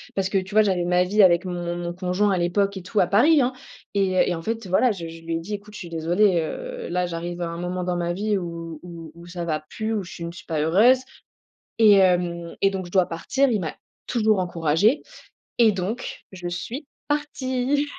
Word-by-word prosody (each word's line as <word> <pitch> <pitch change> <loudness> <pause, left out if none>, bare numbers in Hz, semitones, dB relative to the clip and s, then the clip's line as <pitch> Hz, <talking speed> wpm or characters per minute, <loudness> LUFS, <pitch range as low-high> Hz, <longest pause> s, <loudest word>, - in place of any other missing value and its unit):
parce 190 -1 0
que 195 - +1
tu 190 +2 -8
vois, 215 - +8
j'avais 185 -4 +1
ma 180 +1 +3
vie 205 +3 +4
avec 180 0 +5
mon 175 -1 -3
mon 175 0 -4
conjoint 185 +3 +1
à 190 - +1
l'époque 195 +3 +1
et 190 - -7
tout 205 +3 -1
à 180 - +4
Paris, 280 - +5
hein 255 +1 +1 0.4
et 190 -2 +2
et 175 - 0
en 165 - -6
fait, 225 -2 -3
voilà, 225 +7 +3
je 170 -5 -5
je 165 0 -10
lui 165 0 -2
ai - - -3
dit: 190 +6 -6
«Écoute, 205 +1 -11
je - - -7
suis 175 - -8
désolée, 175 +3 +2
heu, - - -5
là 180 0 0
j'arrive 175 +1 -5
à 170 - -1
un 170 - -6
moment 180 +1 -3
dans 180 0 -1
ma 175 0 -1
vie 205 +3 0
où 165 -3 -6
où 170 -2 -9
où 170 0 -13
ça 175 -1 -5
va 155 -2 -1
plus, 220 0 -2
où 205 - -1
je 175 - -10
ne 170 - -4
suis 170 - -12
pas 160 -2 -2
heureuse 210 +12 +5 0.8
et 215 -2 +8
hem 175 -3 +2
et 195 - +5
donc 190 -1 -4
je 175 - -13
dois 185 -2 +3
partir». 265 +12 0
Il 215 - +1
m'a 160 -4 -4 0.3
toujours 215 -4 +2
encouragée 175 - +2 0.6
et 230 -2 +6
donc 195 +6 -4
je 180 -2 -6
suis 235 - -5 0.2
partie! 285 -1 0
185 Hz, 230 wpm, -24 LUFS, 175-210 Hz, 0.8 s, vois